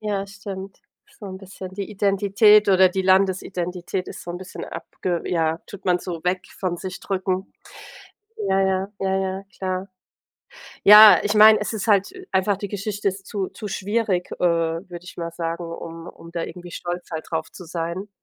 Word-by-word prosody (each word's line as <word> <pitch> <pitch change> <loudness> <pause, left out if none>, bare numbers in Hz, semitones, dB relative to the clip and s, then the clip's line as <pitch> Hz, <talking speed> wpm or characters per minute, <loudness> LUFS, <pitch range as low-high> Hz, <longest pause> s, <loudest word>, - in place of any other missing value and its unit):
Ja, 205 -2 -2
stimmt. 195 -1 -8 0.4
So 205 - -8
'n 190 -1 -7
bisschen 190 -1 -9
die 200 0 -5
Identität 205 +1 +4
oder 190 -1 +6
die 190 +1 -2
Landesidentität 185 -1 0
ist - - -8
so 175 - -7
'n 175 - -4
bisschen 185 0 -8
abge 175 -2 -4
ja, 165 -2 +1
tut 200 - -11
man 180 -1 +3
so 170 -2 -6
weg 185 +1 +1 0.2
von 180 -2 -1
sich 185 +1 -7
drücken. 190 0 -2 0.9
Ja, 195 0 +2
ja, 190 0 +1
ja, 190 0 +1
ja, 190 0 -2
klar. 185 0 -3 1.0
Ja, 210 +1 +10
ich 210 +1 0
meine, 215 +1 +8
es - - -3
ist 220 0 -4
halt 200 -2 +3
äh, - - -12
einfach 190 +1 +2
die 205 - -5
Geschichte 205 0 -2
ist 195 0 -6
zu 195 -2 -3
zu 215 - -9
schwierig, 200 -2 -1
äh, - - -7
würde 170 +1 -1
ich 180 - -11
mal 170 -1 -4
sagen, 165 +1 -4
um 165 0 -8
um 165 - -13
da 170 -1 -2
irgendwie 175 -1 -9
stolz 175 0 -5
halt 160 - -4
drauf 160 -1 -3
zu 180 - -10
sein. 170 +3 -4
190 Hz, 185 wpm, -23 LUFS, 175-200 Hz, 1.0 s, Ja